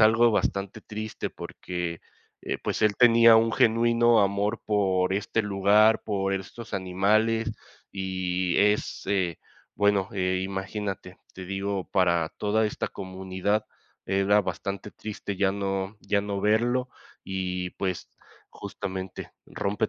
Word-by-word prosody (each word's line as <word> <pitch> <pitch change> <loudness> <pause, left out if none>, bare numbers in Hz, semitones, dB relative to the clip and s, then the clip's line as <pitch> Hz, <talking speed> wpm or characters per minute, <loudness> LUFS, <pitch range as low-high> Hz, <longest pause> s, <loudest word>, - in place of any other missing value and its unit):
algo 115 +2 +6
bastante 100 -1 -1
triste, 110 0 -5
porque, 90 -2 -5 0.4
eh - - -3
pues, - - -2
él 105 -1 +3
tenía 115 -2 +7
un 115 0 +3
genuino 115 +1 +4
amor 100 +3 0
por 95 -3 +1
este 105 +2 0
lugar, 105 +2 +4
por 100 -2 -1
estos 105 +4 -7
animales, 110 +5 +1 0.4
y 95 -2 -1
es, 105 +1 +1
eh, 95 -5 0 0.4
bueno, 100 -2 +2
eh, 95 -1 0
imagínate, 95 -1 -5 0.2
te 95 - -8
digo, 95 0 -3
para 85 -4 +2
toda 110 +1 +1
esta - - -3
comunidad 95 +2 -2 0.4
era 100 +2 +3
bastante 100 +1 -5
triste 105 -1 -6
ya 95 -1 +2
no 95 +1 -3
ya 100 - +1
no 100 -1 -3
verlo 120 +5 +2 0.4
y, 90 -1 -3
pues, 95 -2 -4 0.4
justamente, 95 -1 -6
rompe 105 +2 -2
100 Hz, 125 wpm, -26 LUFS, 95-110 Hz, 0.4 s, tenía